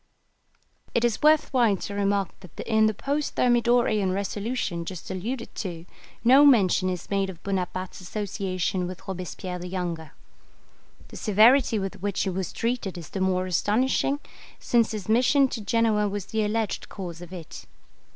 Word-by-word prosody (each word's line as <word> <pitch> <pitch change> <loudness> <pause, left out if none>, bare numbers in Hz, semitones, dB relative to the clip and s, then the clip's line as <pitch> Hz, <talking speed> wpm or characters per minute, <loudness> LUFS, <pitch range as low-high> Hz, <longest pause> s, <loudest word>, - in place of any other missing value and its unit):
It 235 0 +3
is 235 -3 0
worth 305 -1 +4
while 235 -6 +3
to 200 - -6
remark 200 -1 +1
that 180 -5 -15
in 220 -1 +3
the 215 - +1
post 285 +5 -2
Thermidorian 240 -5 +3
resolution 200 -3 -2
just 180 +1 -7
alluded 230 +7 -4
to 170 -5 -5 0.4
no 260 +4 +7
mention 195 -9 +5
is 180 +1 -5
made 195 -1 +1
of 180 -2 -10
Bonaparte's 185 -1 -3
association 185 -2 -2
with 185 0 -9
Robespierre 185 0 -5
the 180 - -6
younger. 175 -4 -4 1.0
The - - -10
severity 225 +3 +5
with 195 -2 -4
which 200 -1 -1
he 190 - -1
was 185 -1 -3
treated 230 -6 -2
is 165 -3 -9
the 195 - -4
more 185 -1 +1
astonishing, 245 - +1 0.4
since 235 -2 +2
his 210 -5 -5
mission 255 +5 +4
to 230 - -4
Genoa 210 -1 +2
was 200 -1 -4
the 220 -1 -1
alleged 215 0 -2
cause 175 -4 -7
of 175 0 -10
it. 175 -4 -9
200 Hz, 160 wpm, -26 LUFS, 185-230 Hz, 1.0 s, no